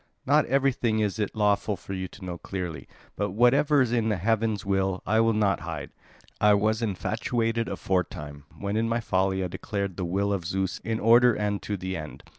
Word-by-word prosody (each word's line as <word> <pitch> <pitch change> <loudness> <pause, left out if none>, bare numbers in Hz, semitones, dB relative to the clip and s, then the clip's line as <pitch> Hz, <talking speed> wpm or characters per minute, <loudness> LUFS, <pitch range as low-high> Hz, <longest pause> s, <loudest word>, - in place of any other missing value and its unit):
Not 145 +2 +3
everything 130 -4 +1
is 105 0 0
it 105 0 -2
lawful 105 0 +1
for 95 - -8
you 95 -1 -3
to 95 +1 -12
know 90 -2 -5
clearly; 90 -8 -5 0.3
but 100 -2 -2
whatever 140 +6 +4
is 120 - -2
heaven's 110 -1 0
will, 95 -1 0
I 110 +3 +2
will 115 0 +4
not 100 -5 +2
hide. - - -6 0.5
I 105 0 +5
was 110 +2 +1
infatuated 115 +2 -1
aforetime, 75 -6 -3
when 100 +1 -2
in 115 +1 +1
my 115 +1 +1
folly 95 -3 0
I - - -1
declared 100 +1 -4
the 95 - -2
will 100 +3 0
of 95 -3 -2
Zeus 95 +2 -2
in 110 0 -3
order 120 +1 +6
and 105 -1 -1
to 105 - -3
the 95 +1 -4
end. 75 -2 -8
105 Hz, 190 wpm, -26 LUFS, 95-115 Hz, 0.5 s, order